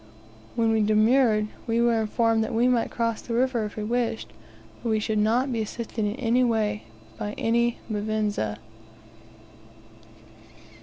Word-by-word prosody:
When 225 -1 +2
we 220 -1 +2
demurred, 215 +1 +3 0.2
we 230 0 +1
were 235 -1 +3
informed 225 0 +1
we 235 +2 +2
might 245 -2 +2
cross 230 -2 -1
the 230 - -4
river 245 -2 +1
if 210 - -7
we 215 - -4
wished, 235 0 -2 0.5
but 235 - -3
we 220 -1 +2
should 215 0 -1
not 240 +6 +2
be 225 - -1
assisted 225 +1 -4 1.2
by 210 - -3
any 235 +1 +1
Mvinza. 210 - -1
225 Hz, 125 wpm, -25 LUFS, 215-235 Hz, 1.2 s, demurred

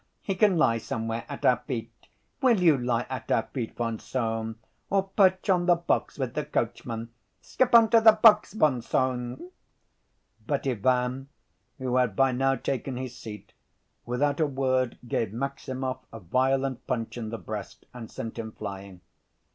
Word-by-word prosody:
He 195 - -1
can 190 -1 +3
lie 115 -7 +3
somewhere 115 +1 -4
at 140 - -5
our 125 - +5
feet. 115 -4 -4 0.5
Will 240 -6 +4
you 170 -4 +5
lie 120 -2 -1
at 130 -3 -6
our 115 - +3
feet, 120 -5 -4
von 115 -2 -2
Sohn? 115 -3 -3 0.3
Or 195 0 +2
perch 190 -1 +3
on 180 -2 +2
the 175 - +6
box 170 0 -1
with - - -3
the - - -1
coachman. 115 -1 -3 0.3
Skip 245 - +1
on 230 -1 +8
to 230 - +6
the 220 -1 +8
box, 215 0 +5
von 150 - +2
Sohn!" 130 +6 -2 1.0
But 140 -2 -1
Ivan, 130 +2 0 0.5
who 130 -2 -1
had 125 -6 +2
by 135 +3 +3
now 135 +2 +1
taken 130 -1 -3
his 130 -1 -5
seat, 105 -3 -10 0.5
without 140 +5 0
a 155 - +3
word 130 -2 0
gave 110 -3 -1
Maximov 130 +1 -4
a 115 - -8
violent 130 +6 0
punch 115 -3 -2
in 115 -3 -5
the 115 - -4
breast 105 -3 -7
and 120 -3 -8
sent 115 +1 -6
him 110 -1 -6
flying. 100 -3 -8
130 Hz, 165 wpm, -27 LUFS, 115-145 Hz, 1.0 s, on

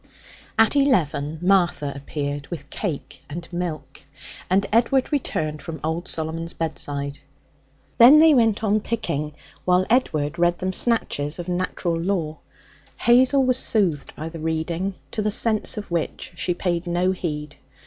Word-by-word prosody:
At 225 +4 +4
eleven 160 - +1
Martha 175 -7 +2
appeared 145 0 -4
with 150 -4 -8
cake 170 -9 -5
and 170 +3 -6
milk, 155 -6 -5 0.5
and 195 +2 +3
Edward 255 +5 +3
returned 155 - -2
from 160 -1 -7
old 160 +3 -2
Solomon's 165 +1 -4
bedside. 145 -3 -3 0.8
Then 250 +6 +10
they 315 0 +7
went 225 -4 +3
on 215 0 +2
picking, 200 -10 -3 0.3
while 180 0 +3
Edward 155 - +1
read 175 0 +3
them 185 +1 -2
snatches 160 -11 +1
of 175 -1 -6
'Natural 180 -1 -1
Law.' 165 -4 -2 0.6
Hazel 260 +3 +4
was 255 0 +2
soothed 180 -10 0
by 155 - -5
the 165 0 -9
reading, 165 +4 -2 0.2
to 215 - -1
the 210 - +1
sense 215 0 +1
of 205 -4 -6
which 170 -2 -3
she 175 +1 -1
paid 175 -1 -2
no 175 +2 +1
heed. 150 -5 -4
175 Hz, 145 wpm, -23 LUFS, 155-210 Hz, 0.8 s, Then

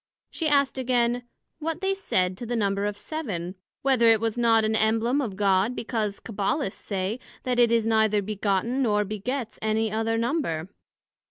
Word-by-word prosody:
she 325 - -2
asked 280 -2 +2
again, 245 -1 +1 0.3
What 325 +2 -3
they 385 0 +1
said 185 - 0
to 240 - -6
the 240 - -1
number 200 -2 0
of 205 0 -4
Seven? 200 - -4 0.3
whether 260 -4 +4
it 225 -1 +5
was 225 0 -1
not 230 -2 +3
an 215 - +1
Embleme 225 +5 +2
of 210 -6 -4
God, 200 +3 +2
because 215 -4 -2
Cabbalists 205 +2 -2
say, 200 +3 -2 0.2
That 250 -1 0
it 235 -1 +5
is 230 -1 +3
neither 220 -2 +3
begotten, 210 +5 0
nor 210 -4 +2
begets 220 +4 -4
any 220 0 0
other 225 +1 0
Number? 230 - -1
225 Hz, 170 wpm, -26 LUFS, 205-245 Hz, 0.3 s, it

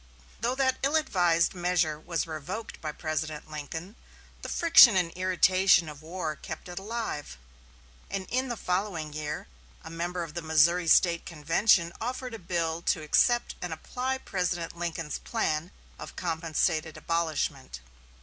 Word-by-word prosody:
Though 240 +2 0
that 260 -1 +2
ill 280 +3 +1
advised 175 - +2
measure 175 -4 0
was 165 0 -2
revoked 160 +8 -6
by 155 - -3
President 155 0 -4
Lincoln, 160 - -6 0.5
the - - -6
friction 325 - +7
and 180 -3 +1
irritation 185 -1 +3
of 150 -1 -9
war 160 -1 -4
kept - - -8
it 175 +1 -6
alive, 210 - -5 0.7
and 195 -1 -3
in 255 +2 0
the 240 -2 -4
following 180 -6 -2
year 150 0 -4 0.4
a - - -9
member 175 +1 -3
of 160 -2 -8
the 170 - -4
Missouri 165 +2 +3
State 170 0 +4
convention 170 +2 +2
offered 250 +1 -4
a 225 - -6
bill 170 -2 -2
to 160 - 0
accept 240 +10 +3
and 180 - -4
apply 255 +11 -3
President 175 -8 -3
Lincoln's 165 -2 -4
plan 165 -7 -1 0.3
of - - -9
compensated 160 -1 -1
abolishment. 160 - -2
170 Hz, 145 wpm, -28 LUFS, 160-195 Hz, 0.7 s, friction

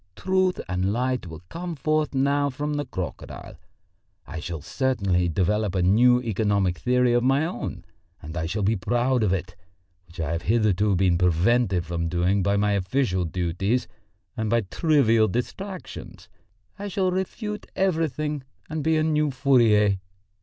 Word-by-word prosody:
Truth 185 -1 +1
and 95 +1 0
light 125 -1 -1
will 80 0 -10
come 170 - -5
forth 155 0 0
now 140 +1 +2
from 145 +3 -3
the 145 0 -2
crocodile. 90 - -7 0.7
I - - -6
shall 85 -3 -6
certainly 100 -10 0
develop 100 +3 0
a 90 - +1
new 120 +7 +5
economic 100 -5 0
theory 125 -1 +2
of 120 - +3
my 135 +4 +3
own 175 - -5 0.3
and 80 +2 -9
I 80 -2 -2
shall 100 +4 -2
be 105 +4 +2
proud 120 +5 +1
of 105 -4 +2
it 90 -1 -3 0.5
which 85 +1 -14
I 80 -1 -2
have 85 0 -2
hitherto 105 -1 +2
been 90 -2 +2
prevented 90 +2 +2
from 85 -1 -2
doing 90 +4 +1
by 100 +2 +1
my 105 0 +2
official 95 -1 0
duties 90 +7 -1 0.5
and 110 -1 -2
by 115 +1 +3
trivial 115 - +3
distractions. 185 - -6 0.5
I 205 - -4
shall 190 -2 0
refute 210 +3 -4
everything 155 -5 0 0.3
and 155 -1 -2
be 160 +1 +2
a 155 - +2
new 150 -1 +1
Fourier. 115 -7 +3
110 Hz, 155 wpm, -25 LUFS, 90-145 Hz, 0.7 s, new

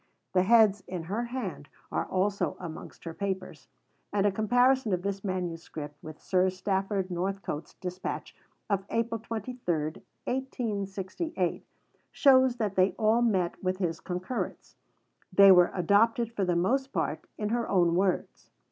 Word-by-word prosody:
The 185 - +4
heads, 210 -1 +5
in 180 -3 -4
her 210 +8 -2
hand, 235 - -5 0.2
are - - 0
also 195 +2 0
amongst 165 -3 -9
her 165 - -6
papers, 190 -7 -4 0.4
and 200 -1 +1
a 205 - +4
comparison 245 +2 +3
of 180 0 -1
this 200 0 -3
manuscript 165 -5 -4
with 155 -1 -10
Sir 185 0 +2
Stafford 190 0 -1
Northcote's 180 -3 -3
dispatch 180 0 -5 0.3
of 200 -2 0
April 230 0 -1
23, 230 +2 -5 0.7
1868, 205 - -2 0.5
shows 260 -3 +5
that 215 -5 -1
they 190 0 +3
all 220 +2 +3
met 190 -8 0
with 185 0 0
his 170 -4 -2
concurrence; 185 +7 -4 0.6
they 195 +1 +8
were 180 -1 +7
adopted 220 +6 +3
for 200 -4 0
the 175 -1 +1
most 265 +10 +1
part - - -2
in 210 -1 -2
her 235 +1 -1
own 175 -3 +3
words. 185 +1 -1
195 Hz, 140 wpm, -29 LUFS, 180-225 Hz, 0.7 s, they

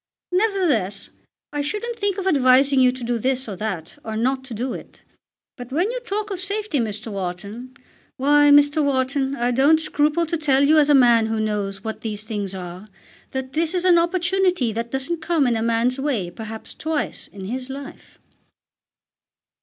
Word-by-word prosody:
Nevertheless 350 - 0 0.4
I 290 - -1
shouldn't 425 +10 -3
think 405 -4 -1
of 390 - -3
advising 270 -4 +4
you 255 -1 +5
to 255 -1 -8
do 235 0 -1
this 260 +2 -1
or 205 - -5
that, 185 -6 -5
or 220 -1 -4
not 260 +3 0
to 245 -4 -7
do 250 +4 -3
it. - - -11 0.5
But 245 0 -9
when 350 - +1
you - - -3
talk 425 -3 -4
of 380 - -4
safety, 400 -4 -2
Mr. 215 -1 -4
Wharton, 200 +7 -6 0.4
why, 290 +2 +4
Mr. 290 +1 +5
Wharton, 270 0 0
I 245 -1 0
don't 280 +6 +4
scruple 305 +1 +1
to 335 +1 -2
tell 280 -3 +3
you 310 +1 +6
as 295 -1 +3
a 290 - +6
man 240 -4 +5
who 225 0 -1
knows 205 -2 -2
what 220 0 -5
these 215 -2 -4
things 205 -3 -4
are, 180 +2 -8 0.4
that 265 0 -5
this 325 +3 0
is 360 0 0
an 350 -2 +6
opportunity 355 - +1
that 230 +2 -3
doesn't 270 +6 -3
come 315 -2 +1
in 240 -2 +2
a 225 - -1
man's 235 +3 +1
way 245 -11 -1
perhaps 220 +3 -8
twice 315 -1 -3
in 195 -2 -10
his 255 +5 -5
life." 275 +1 -9
265 Hz, 185 wpm, -22 LUFS, 225-315 Hz, 0.5 s, you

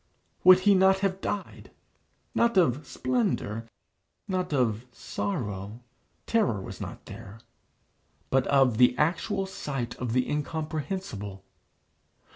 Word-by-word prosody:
Would 185 0 +8
he 205 +1 +5
not 190 0 +4
have 195 -1 0
died, 205 -2 -4 0.6
not 235 -3 +2
of 150 -5 +3
splendour, 120 -4 -1 0.6
not 185 -2 -1
of 125 -4 0
sorrow, 105 - -4 0.5
(terror 210 - +1
was 95 - -8
not - - -7
there,) 105 +3 -10 0.9
but 130 0 +3
of 135 -5 +3
the 125 0 +5
actual 175 +5 0
sight 135 -10 -4
of 125 -3 -3
the 125 0 +2
incomprehensible? 150 - -4
140 Hz, 110 wpm, -28 LUFS, 115-185 Hz, 0.9 s, Would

